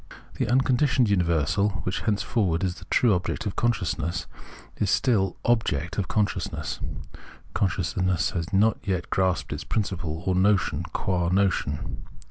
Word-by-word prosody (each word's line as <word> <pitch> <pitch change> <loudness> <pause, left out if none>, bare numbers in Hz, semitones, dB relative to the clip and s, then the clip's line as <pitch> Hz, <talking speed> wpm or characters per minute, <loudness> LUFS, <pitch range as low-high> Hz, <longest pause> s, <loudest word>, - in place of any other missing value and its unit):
This - - -2
unconditioned 130 -2 +3
universal, 90 +2 +2
which 90 - -2
henceforward 100 -5 0
is 90 -2 0
the - - -13
true 120 -4 +3
object 90 +4 -2
of 100 - -3
consciousness, 90 -6 -1 0.5
is - - 0
still 100 -8 +2
object 105 -6 +1
of 95 - -1
consciousness; 105 -3 -1 0.7
consciousness 90 -1 0
has 85 -2 -3
not 105 +3 +3
yet 95 -4 -2
grasped 90 -7 +1
its 75 - -5
principle, 90 -6 -2
or 95 - +2
notion, 95 -4 +2
qua 90 -2 0
notion. 90 -6 0
95 Hz, 130 wpm, -26 LUFS, 85-105 Hz, 0.7 s, unconditioned